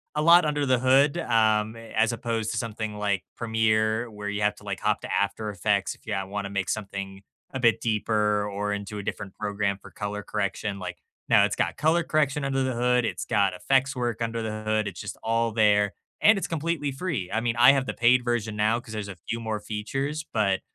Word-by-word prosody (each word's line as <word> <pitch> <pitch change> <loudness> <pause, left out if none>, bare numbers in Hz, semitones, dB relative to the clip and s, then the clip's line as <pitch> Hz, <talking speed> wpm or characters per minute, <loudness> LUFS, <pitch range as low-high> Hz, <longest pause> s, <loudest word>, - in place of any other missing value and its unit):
a 150 - +1
lot 170 +1 +7
under 145 -1 0
the 130 -2 +3
hood, 135 +5 +4
um, 110 -5 +2
as 115 0 0
opposed 115 -2 -2
to - - -3
something 110 -2 -4
like 100 -3 -1
Premiere 110 0 +1
where 105 -1 -6
you 105 0 -3
have 105 0 +2
to, 105 - -16
like, 100 -2 -4
hop 105 0 +1
to - - -5
After 105 +1 -1
Effects, 100 +1 0
if - - -27
you, 105 - -2
uh, 95 - -2
wanna 100 +1 -4
make 100 -2 -2
something 100 -2 -4 0.3
a 130 - -3
bit 115 -2 +3
deeper 105 -2 +1
or 105 +1 -2
into 105 +1 -5
a 100 - -5
different 100 -1 -5
program 100 -1 -1
for - - -14
color 105 0 -5
correction, 100 -1 -3
like, 90 -1 -6 0.3
now - - +6
it's - - -2
got - - -1
color 160 +3 +2
correction 150 -3 +1
under 135 -1 0
the 130 -1 -1
hood, 125 0 +2
it's - - -3
got 100 -4 +2
effects 135 +8 +1
work 120 -2 -2
under 115 0 -2
the 110 -1 -4
hood, 110 -1 0
it's 95 - -6
just 105 - -6
all 115 0 +1
there, 105 -2 +3 0.3
and 215 -1 +6
it's - - -3
completely 160 -3 -2
free, 135 - -3
I 110 - +1
mean, 115 -1 0
I 125 +3 +8
have 135 -1 +1
the - - -3
paid 120 +1 +4
version 115 -3 -1
now, 110 +3 +2
'cause 115 -2 -11
there's 105 -2 -4
a 95 - -8
few 115 - -1
more 110 -2 -3
features, 135 +9 -3
but 100 -4 +1
110 Hz, 225 wpm, -26 LUFS, 105-125 Hz, 0.3 s, I